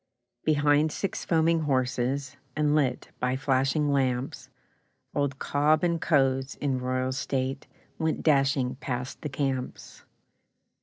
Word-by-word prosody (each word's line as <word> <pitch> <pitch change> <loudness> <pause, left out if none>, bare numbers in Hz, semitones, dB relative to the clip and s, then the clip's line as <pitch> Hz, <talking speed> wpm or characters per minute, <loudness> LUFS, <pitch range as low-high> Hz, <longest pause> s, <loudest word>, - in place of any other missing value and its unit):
Behind 150 0 +3
six 195 - -3
foaming 165 0 +3
horses, 135 -1 -1 0.2
And 150 -1 +2
lit 135 -5 0
by 125 +1 0
flashing 135 +1 +1
lamps, 130 -2 -1 0.6
Old 140 -2 -1
'Cobb 150 +3 +2
and 170 -1 +1
Co.'s', 135 -3 +2
in 135 -3 -1
royal 130 0 -1
state, 135 0 -2 0.3
Went 160 -1 -1
dashing 135 -3 +2
past 125 -1 -4
the 150 - -4
camps. 135 -2 -4
140 Hz, 115 wpm, -27 LUFS, 130-150 Hz, 0.6 s, Behind